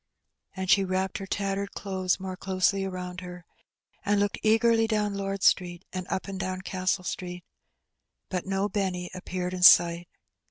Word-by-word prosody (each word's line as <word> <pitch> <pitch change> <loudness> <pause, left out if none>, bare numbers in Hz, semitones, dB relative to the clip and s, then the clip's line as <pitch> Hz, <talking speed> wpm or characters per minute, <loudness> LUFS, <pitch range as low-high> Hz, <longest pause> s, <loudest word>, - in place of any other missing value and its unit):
And 190 -1 -4
she 195 +1 +5
wrapped 190 0 -1
her 195 - -7
tattered 200 0 -2
clothes 190 -2 -1
more 185 -1 -5
closely 190 +1 0
around 180 -1 -5
her, 180 -1 -9 0.6
and 205 -1 +2
looked 205 0 0
eagerly 225 +1 +3
down 210 -2 0
Lord 195 -1 -3
Street 175 0 +2
and 185 -1 -4
up 190 - -2
and 195 -1 -5
down 185 -1 -3
Castle 185 0 -1
Street. 180 0 -5 0.8
But 185 0 -4
no 195 +1 0
Benny 185 -4 -2
appeared 180 0 -4
in 180 - -4
sight. 170 -1 +7
190 Hz, 160 wpm, -27 LUFS, 180-200 Hz, 0.8 s, sight